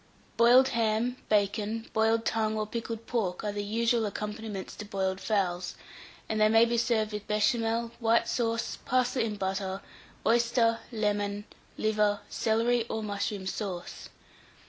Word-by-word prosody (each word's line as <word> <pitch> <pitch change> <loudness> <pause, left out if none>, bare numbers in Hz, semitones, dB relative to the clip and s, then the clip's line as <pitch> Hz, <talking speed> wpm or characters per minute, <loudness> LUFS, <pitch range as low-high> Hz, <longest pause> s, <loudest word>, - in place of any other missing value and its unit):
Boiled 245 +3 +6
ham, 230 +2 0
bacon, 210 +2 0
boiled 225 +1 +2
tongue, 220 -1 0
or 215 - 0
pickled 230 +1 -5
pork, 195 -7 -2
are 210 - -1
the 205 0 -3
usual 230 +1 +1
accompaniments 210 -1 -5
to - - -6
boiled 190 -2 -2
fowls, 185 -4 -1 0.5
and 215 -1 -1
they 215 - +6
may 225 +1 +6
be 235 0 0
served 225 -2 +1
with 210 0 -5
Béchamel, 225 +2 +1
white 230 0 +3
sauce, 230 -1 -1
parsley 255 -1 +1
and 210 -1 -4
butter, 190 0 -2 0.5
oyster, 230 0 +3
lemon, 205 -2 -1 0.3
liver, 210 -1 +2
celery, 230 +2 +1
or 220 - -2
mushroom 200 -1 -3
sauce. 190 -2 -5
220 Hz, 140 wpm, -29 LUFS, 205-230 Hz, 0.5 s, Boiled